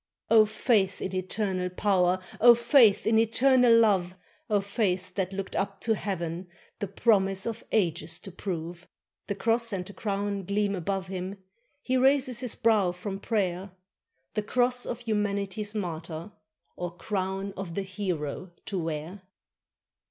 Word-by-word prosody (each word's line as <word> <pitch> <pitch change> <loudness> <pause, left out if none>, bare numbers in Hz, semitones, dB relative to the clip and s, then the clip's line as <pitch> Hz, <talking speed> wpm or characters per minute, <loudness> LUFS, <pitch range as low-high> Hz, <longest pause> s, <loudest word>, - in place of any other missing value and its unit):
O 220 -1 +7
faith 210 -3 +1
in 190 - -4
Eternal 185 0 -1
Power! 185 -1 +2 0.2
O 240 +1 +8
faith 235 -3 +5
in 220 0 +4
Eternal 240 +1 +5
Love! 190 -5 +3 0.3
O 210 -1 +3
faith 190 -3 -1
that 190 -1 -2
looked 195 0 -5
up 195 0 -2
to 225 - +2
heaven 180 -4 -4 0.3
The 205 - -2
promise 195 -1 +2
of 230 -1 -4
ages 170 -5 0
to 195 - -9
prove! 175 -1 -6 0.4
The 200 - -2
cross 230 +2 +2
and 185 -3 -3
the 205 - -8
crown 200 -1 -2
gleam 200 +1 0
above 190 +1 -2
him; 190 +1 -5 0.5
He 260 0 +1
raises 260 -2 +3
his 250 -3 -1
brow 210 -6 +2
from 195 +2 -6
prayer, 195 -3 -2 0.6
The 215 - 0
cross 245 +3 +1
of 235 - -4
humanity's 205 -1 -2
martyr 170 -1 -5 0.4
Or 175 0 -6
crown 195 -1 -3
of 180 -3 -6
the 200 - -1
hero 185 -3 -4
to 195 -3 -3
wear. 165 +4 -4
195 Hz, 145 wpm, -28 LUFS, 185-220 Hz, 0.6 s, O